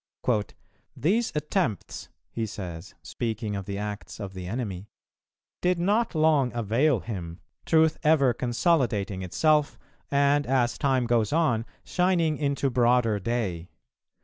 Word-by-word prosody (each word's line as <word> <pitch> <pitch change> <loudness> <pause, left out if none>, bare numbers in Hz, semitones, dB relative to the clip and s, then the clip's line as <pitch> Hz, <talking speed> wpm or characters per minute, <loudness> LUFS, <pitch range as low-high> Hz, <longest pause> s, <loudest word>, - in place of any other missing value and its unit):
"These 200 - +1
attempts," 150 - -2 0.2
he 115 -1 -3
says, 90 -4 -8
speaking 110 -3 -3
of 100 -1 -4
the 100 -1 -3
acts 105 +1 -6
of 100 -3 -6
the 90 -1 -7
enemy, 100 -3 -4 0.7
"did 180 0 +2
not 205 +4 +1
long 155 -5 +3
avail 120 +3 +2
him, 90 -6 -6 0.3
Truth 160 -1 +3
ever 145 -5 +4
consolidating 120 - 0
itself, 150 - +1 0.3
and, 140 +1 +2
as 125 -2 +1
time 130 -4 +2
goes 115 -3 +1
on, 125 -8 +1 0.2
shining 175 -4 +1
into 140 -2 0
broader 120 -3 +3
day. 95 -6 -2
120 Hz, 120 wpm, -26 LUFS, 105-155 Hz, 0.7 s, ever